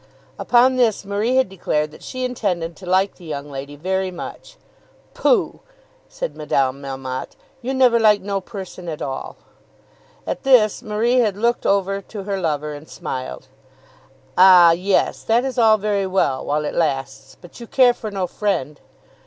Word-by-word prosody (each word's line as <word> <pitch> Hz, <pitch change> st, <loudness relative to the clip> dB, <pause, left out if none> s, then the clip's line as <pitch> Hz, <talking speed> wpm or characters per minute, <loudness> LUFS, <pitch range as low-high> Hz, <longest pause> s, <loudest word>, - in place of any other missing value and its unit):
Upon 250 Hz, +2 st, +4 dB
this 225 Hz, -5 st, +1 dB
Marie 205 Hz, +5 st, 0 dB
had 260 Hz, 0 st, +3 dB
declared 155 Hz, -5 st, -2 dB
that -, -, -15 dB
she 255 Hz, 0 st, -4 dB
intended 180 Hz, -9 st, -2 dB
to 185 Hz, -, -12 dB
like 190 Hz, +2 st, +1 dB
the 180 Hz, -, -16 dB
young 145 Hz, -3 st, -6 dB
lady 140 Hz, +1 st, -7 dB
very 190 Hz, +5 st, -2 dB
much. 185 Hz, -, -9 dB, 0.6 s
"Pooh!" 460 Hz, -6 st, +1 dB, 0.5 s
said -, -, -5 dB
Madame 140 Hz, -2 st, 0 dB
Melmotte. 135 Hz, -2 st, -6 dB, 0.3 s
"You 260 Hz, +2 st, -3 dB
never 250 Hz, -3 st, +4 dB
like 210 Hz, -2 st, +5 dB
no 195 Hz, 0 st, -3 dB
person 185 Hz, -2 st, -8 dB
at 155 Hz, -, -5 dB
all." 135 Hz, -1 st, -5 dB, 0.9 s
At -, -, -3 dB
this 245 Hz, -6 st, +4 dB
Marie 225 Hz, +4 st, +1 dB
had 210 Hz, -5 st, +1 dB
looked 235 Hz, +3 st, 0 dB
over 195 Hz, 0 st, +1 dB
to 200 Hz, 0 st, -8 dB
her 195 Hz, 0 st, -3 dB
lover 150 Hz, -3 st, -2 dB
and 145 Hz, +2 st, -11 dB
smiled. 130 Hz, -, -6 dB, 0.9 s
"Ah, 180 Hz, -2 st, +8 dB
yes; 185 Hz, +3 st, +1 dB
that 235 Hz, +3 st, +1 dB
is 260 Hz, -1 st, -3 dB
all 220 Hz, -2 st, +5 dB
very 200 Hz, -1 st, -1 dB
well, 185 Hz, -8 st, 0 dB
while 150 Hz, +1 st, -1 dB
it -, -, -3 dB
lasts; 135 Hz, -4 st, -2 dB
but 175 Hz, +5 st, -14 dB
you 235 Hz, -, -9 dB
care 250 Hz, 0 st, +4 dB
for 220 Hz, -2 st, -7 dB
no 195 Hz, -2 st, -2 dB
friend." 175 Hz, -7 st, -2 dB
195 Hz, 165 wpm, -21 LUFS, 150-225 Hz, 0.9 s, Ah